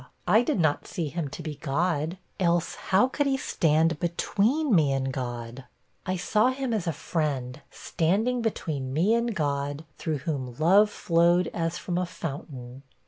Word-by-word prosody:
I 215 +6 +6
did 245 -3 0
not 155 -3 +1
see 165 -4 -3
him 165 0 -3
to 165 - -8
be 155 -1 -4
God; 160 +3 -1 0.2
else, 170 -2 +1
how 195 +7 +2
could 285 +2 -1
he 270 -1 +2
stand 160 - +1
between 215 - +1
me 155 -6 +4
and 135 -1 -1
God? 120 0 -5 0.4
I 185 - 0
saw 210 +5 +2
him 260 -2 -2
as 205 -6 -1
a - - +2
friend, 140 -5 -3
standing 215 +9 0
between 150 - -2
me 180 +9 +3
and 235 -1 0
God, 145 -1 -2
through 155 -2 -1
whom, 130 -6 -3
love 195 +7 +5
flowed 170 -1 +2
as 165 0 -1
from 175 -1 -2
a 180 - -1
fountain.' 135 -6 -7
165 Hz, 165 wpm, -27 LUFS, 145-195 Hz, 0.4 s, I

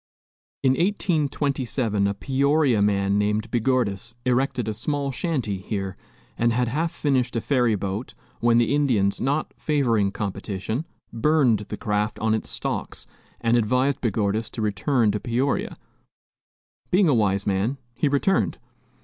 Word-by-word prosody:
In 130 - +5
1827 140 - 0
a 100 - -1
Peoria 140 -1 +2
man 100 0 +2
named 105 +2 0
Begordis 120 -2 0
erected 125 -2 +1
a 110 - -1
small 140 +5 -2
shanty 125 - -2
here 95 -1 -4 0.4
and 120 0 +3
had 120 +1 +1
half 160 +6 -1
finished 135 -7 0
a - - +2
ferry 120 -3 +2
boat 100 +4 -4 0.2
when 120 0 +4
the 120 +2 +3
Indians, 120 -9 +2
not 145 +4 -1
favoring 120 -9 +2
competition, 105 - -4 0.3
burned 130 -3 +3
the - - -4
craft 105 0 -1
on 110 0 +1
its 110 - -2
stocks - - -3 0.4
and 115 +1 +2
advised 125 +4 +1
Begordis 110 -1 0
to 115 - -4
return 110 +3 +1
to 105 - -2
Peoria; 125 +5 -1 1.1
being 185 0 +4
a 150 - +4
wise 100 -4 +1
man, 100 +7 0 0.2
he 145 - 0
returned. 140 - +1
120 Hz, 140 wpm, -24 LUFS, 105-140 Hz, 1.1 s, In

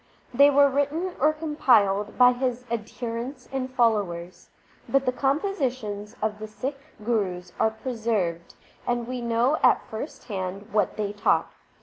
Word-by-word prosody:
They 280 +3 +7
were 285 0 +6
written 290 +7 -1
or 305 +3 +4
compiled 235 -10 +2
by 250 0 +7
his 250 0 -2
adherents 235 +3 -4
and 260 -1 -2
followers. 200 -8 0 0.4
But 275 0 +2
the 255 - +2
compositions 255 - -2
of 210 -1 -1
the 215 - -6
Sikh 265 +6 -5 0.3
Gurus 185 -6 -1
are 220 - +4
preserved, 220 -7 -2 0.3
and 240 -1 0
we 250 0 -4
know 235 +5 +1
at 250 - +4
first 225 +8 -6
hand 195 -1 -5
what 210 -1 +1
they 205 -1 -2
taught. 205 - +1
235 Hz, 140 wpm, -26 LUFS, 210-270 Hz, 0.4 s, They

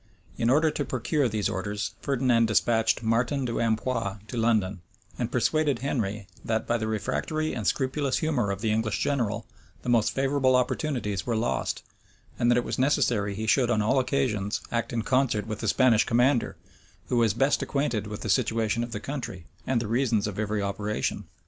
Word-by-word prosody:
In 115 - 0
order 155 +4 +4
to 145 - -2
procure 130 +2 0
these 105 -1 0
orders, 105 +1 -3
Ferdinand 125 -4 +2
despatched 110 +1 +2
Martin 125 +5 +1
de 120 - -2
Ampios 115 -2 -1
to - - -6
London; 110 -5 +1 0.4
and - - -2
persuaded 155 -4 +1
Henry 110 -6 -2 0.2
that, 110 -1 -1
by 120 0 0
the 110 - -2
refractory 155 +8 -2
and 110 -5 -3
scrupulous 135 0 0
humor 140 -10 0
of 100 0 -3
the 110 -2 +1
English 110 -2 0
general, 115 -4 -1 0.4
the - - -3
most 115 -3 +3
favorable 135 -1 +2
opportunities 125 - -1
were 120 - +1
lost; 115 +2 -1 0.6
and 120 - +3
that 120 - +4
it 120 - +2
was - - -3
necessary 120 -7 +2
he 110 +2 -3
should 120 +2 +3
on 110 -3 +2
all 130 +5 +3
occasions 125 -6 0
act 115 -1 -1
in 115 -2 -1
concert 130 -5 +1
with 110 -1 -5
the 110 - -3
Spanish 120 0 +4
commander, 125 +1 +2 0.5
who 125 - +1
was 115 -3 +3
best 135 +4 +2
acquainted 120 -7 -1
with 105 0 -6
the - - -4
situation 115 -2 +1
of 120 -1 -6
the 105 - -3
country, 115 - -6 0.2
and 130 -3 +2
the 115 - -3
reasons 115 -2 +1
of 105 -1 -4
every 105 -1 -1
operation. 105 +2 -2
115 Hz, 185 wpm, -27 LUFS, 110-130 Hz, 0.6 s, order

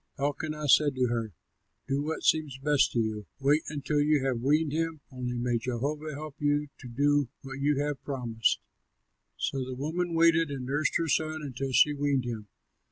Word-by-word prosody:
Elkanah 150 +2 -2
said 145 0 +5
to 125 -1 +1
her, 115 -5 -2 0.5
"Do 135 +1 0
what 155 +2 -3
seems 155 -4 +2
best 145 +1 +3
to 120 - +1
you; 110 -2 -2
wait 145 +3 +3
until 145 0 -1
you 145 -2 +3
have 125 -3 0
weaned 150 +3 +2
him; 165 0 -2
only 125 -1 -4
may 120 -1 0
Jehovah 140 +6 -3
help 155 0 -7
you 145 0 +1
to 130 - -9
do 145 +2 +2
what 135 0 -7
you 145 0 +2
have 145 -1 -2
promised." 120 -5 0 0.8
So 135 -1 -1
the 130 0 -5
woman 165 +5 -2
waited 165 -1 +4
and 135 -3 -4
nursed 145 +4 0
her 165 - -1
son 155 0 0
until 135 -1 -4
she 150 +3 +5
weaned 140 -3 0
him. 110 -3 -5
145 Hz, 180 wpm, -29 LUFS, 130-150 Hz, 0.8 s, said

